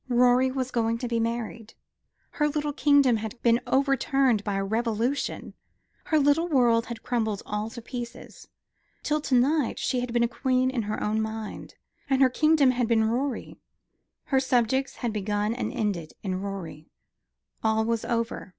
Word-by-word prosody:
Rorie 250 +1 +4
was 260 -1 -3
going 230 -1 0
to 245 - -4
be 235 -1 0
married. 230 -1 -4 0.6
Her 295 - +1
little 295 0 -2
kingdom 280 -3 +4
had 220 +3 -6
been 235 0 +4
overturned 270 -4 +2
by 205 -2 -2
a 195 - 0
revolution: 230 +5 -2 0.5
her 315 - +2
little 290 +3 +3
world 240 -6 +3
had 235 -2 -7
crumbled 220 -4 -1
all 210 +1 -3
to 235 0 -10
pieces. 240 -1 -8 0.6
Till 300 0 0
to 270 -3 0
night 275 +2 +2
she 255 - -1
had 245 -1 -3
been 235 0 +2
a - - +3
queen 255 +1 0
in 250 -3 -1
her 215 - -2
own 215 +1 0
mind; 220 -1 -6 0.3
and 270 -1 +2
her 260 -2 +5
kingdom 305 -1 +4
had 245 -2 0
been 220 -1 +3
Rorie, 265 +2 -3 0.6
her 270 - +1
subjects 260 0 +1
had 235 -4 -3
begun 210 +1 -1
and 250 - -3
ended 185 -8 -3
in 185 -2 -2
Rorie. 175 -6 -7 0.7
All 220 0 +2
was 230 -1 -1
over. 230 -4 -2
240 Hz, 170 wpm, -26 LUFS, 220-265 Hz, 0.7 s, her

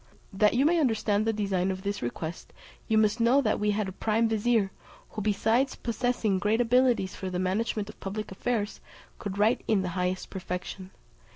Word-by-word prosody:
That 210 +3 +3
you 265 +3 +3
may 340 +2 +4
understand 220 -6 +1
the - - +4
design 195 -3 0
of 190 0 -4
this 200 0 -2
request, 160 +7 -5 0.3
you 220 - +2
must 215 +1 +3
know 235 +4 +4
that 215 -5 0
we 210 - +1
had 210 -1 0
a - - -4
prime 220 +4 +1
vizier, 220 -2 +1 0.4
who 215 - -5
besides 225 +6 +1
possessing 235 -4 0
great 210 +3 +1
abilities 245 -4 +3
for 190 - -5
the 180 - -3
management 200 +3 -1
of 215 - -12
public 205 +2 -5
affairs 210 +1 -2 0.4
could 200 -1 -5
write 215 +4 +3
in 205 -4 +2
the 180 - -2
highest 180 +1 -2
perfection. 185 0 -5
210 Hz, 185 wpm, -28 LUFS, 190-230 Hz, 0.4 s, may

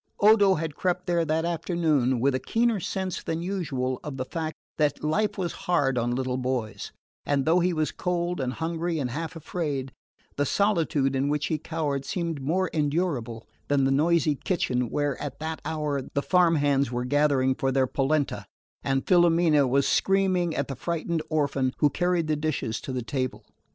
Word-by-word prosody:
Odo 205 -2 +6
had 160 -1 -3
crept 180 +3 -1
there 170 -1 +1
that 160 +2 0
afternoon 160 -7 +1
with 135 +3 +2
a 130 - 0
keener 230 - +1
sense 190 0 -3
than 165 +1 -3
usual 140 -9 -2
of 145 -3 -6
the 130 - -3
fact 160 +2 -4 0.2
that 150 -1 +1
life 205 +9 0
was 175 -3 -1 0.2
hard 140 -7 +3
on 120 -1 0
little 130 0 -1
boys; 125 -4 -3 0.3
and 140 -2 0
though 165 +3 +4
he 180 +1 +2
was 155 -2 0
cold 175 -2 -2
and 130 -1 -2
hungry 165 +2 -2
and 130 -5 -2
half 165 +5 -4
afraid, 145 -5 -3 0.5
the 145 - +2
solitude 160 -9 +1
in 135 +2 +1
which 150 0 0
he 155 - -1
cowered 150 -4 -2
seemed 165 -2 -3
more 180 +7 +1
endurable 145 -7 -1 0.2
than 140 -1 +2
the 135 - +2
noisy 155 +2 +3
kitchen 125 - -1
where, 145 -2 -1
at 140 -2 -5
that 160 +1 -5
hour, 150 -3 -1
the 140 - +1
farm 180 -2 +4
hands 140 -3 +2
were 125 0 -2
gathering 140 -1 +2
for 135 +1 -1
their 130 0 +3
polenta, 140 +3 0 0.4
and 135 0 0
Filomena 170 -5 +4
was 135 +2 +2
screaming 185 -3 +2
at 140 - -1
the 135 - -5
frightened 170 +3 -2
orphan 140 -4 0
who 150 - +3
carried 175 -2 +1
the 155 0 0
dishes 150 -7 -2
to - - -6
the 125 -2 -3
table. 130 +1 -3
150 Hz, 180 wpm, -26 LUFS, 135-170 Hz, 0.5 s, Odo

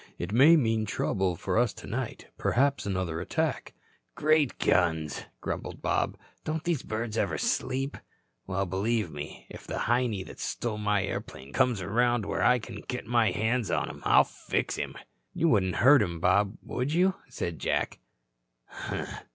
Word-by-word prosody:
It 85 +2 -4
may 145 +8 +8
mean 110 -7 +1
trouble 95 -3 0
for 95 - 0
us 120 -3 +2
tonight, 125 +1 -5
perhaps 140 -2 +1
another 90 -4 -2
attack." 90 - -2 0.4
"Great 155 -3 +3
guns," 80 -4 +1 0.2
grumbled - - -5
Bob, - - 0 0.3
"don't 155 0 -2
these 170 -6 0
birds 110 0 -3
ever 100 - 0
sleep? 135 +2 -1 0.5
Well, 95 +1 0
believe 100 +1 0
me, 75 0 -8
if - - -11
the - - -3
Heinie 120 -5 +1
that - - -12
stole 110 -3 -3
my 105 -2 +1
airplane 70 -7 -6
comes 125 -7 +2
around 120 +3 +2
where 95 -1 -2
I 125 +6 +5
can 110 - -8
get 125 - -4
my 115 -1 +3
hands 110 +1 0
on - - 0
him, - - -12
I'll - - +6
fix - - -2
him." - - -4 0.4
"You 165 - +3
wouldn't 95 - +2
hurt 140 +3 +7
him, 85 -1 -2
Bob, 100 +4 +2
would 130 +4 -2
you?" 180 +4 +3 0.2
said 85 -9 -4
Jack. - - -1
110 Hz, 160 wpm, -28 LUFS, 95-125 Hz, 0.5 s, may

